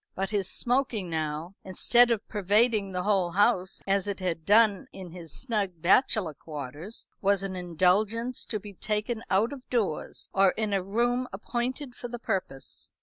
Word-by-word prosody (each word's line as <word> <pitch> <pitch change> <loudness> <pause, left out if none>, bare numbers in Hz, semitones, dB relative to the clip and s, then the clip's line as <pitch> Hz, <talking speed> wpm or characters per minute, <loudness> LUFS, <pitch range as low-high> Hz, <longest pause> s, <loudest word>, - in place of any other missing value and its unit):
But 195 +1 -2
his 200 -3 0
smoking 240 -8 0
now, 160 +2 -3
instead 235 +6 +4
of 225 -3 -1
pervading 210 0 +2
the 180 -1 -2
whole 190 -4 +2
house, 190 -1 +2
as 195 0 +1
it 200 -1 -3
had 170 -4 -3
done 210 -1 +4
in 185 -3 -9
his 170 -3 -8
snug 210 - 0
bachelor 185 - +3
quarters, 150 - -6
was 200 0 +2
an 195 -1 -4
indulgence 195 +8 +1
to 215 - -2
be 205 0 -10
taken 215 +3 -2
out 215 +8 +2
of 260 -2 -11
doors, 215 -11 -1
or 195 -1 +4
in 215 -2 -2
a 195 - +2
room 240 +6 0
appointed 245 +6 -3
for 245 - -7
the 240 0 -6
purpose. 185 - -4
200 Hz, 165 wpm, -28 LUFS, 180-230 Hz, -, instead